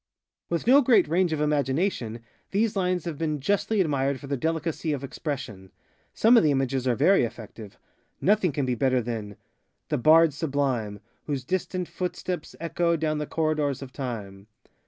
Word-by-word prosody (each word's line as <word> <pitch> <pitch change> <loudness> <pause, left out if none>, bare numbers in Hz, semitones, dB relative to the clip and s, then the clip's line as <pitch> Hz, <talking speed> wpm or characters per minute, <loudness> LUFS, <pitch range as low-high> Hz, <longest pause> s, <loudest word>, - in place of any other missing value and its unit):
With 170 -1 -2
no 270 +4 +7
great 235 -8 +4
range 175 +2 +1
of 155 - -1
imagination, 145 - 0 0.3
these 210 +2 0
lines 180 -3 0
have 165 -4 -5
been 155 -2 -1
justly 205 +7 +1
admired 140 -4 0
for - - -10
their 140 0 -2
delicacy 160 +2 -2
of 140 -1 -4
expression. 130 - -6 0.4
Some 230 +3 +4
of - - +7
the 155 - +4
images 135 -2 0
are 125 - +2
very 160 - +4
effective. 110 -2 -8 0.4
Nothing 200 -3 +2
can 140 -1 -1
be 125 - 0
better 130 +1 +1
thanŌĆö 110 -3 -5 0.6
ŌĆöŌĆöŌĆöŌĆöŌĆöŌĆöŌĆöthe - - 0
bards 160 +1 +6
sublime, 130 -9 -1 0.3
Whose 140 -4 -2
distant 180 +3 -2
footsteps 180 -1 -4
echo 170 +1 0
Down 155 -1 -1
the 150 - -3
corridors 150 -4 -1
of 130 - -11
Time. 105 -7 -6
150 Hz, 165 wpm, -26 LUFS, 130-170 Hz, 0.6 s, no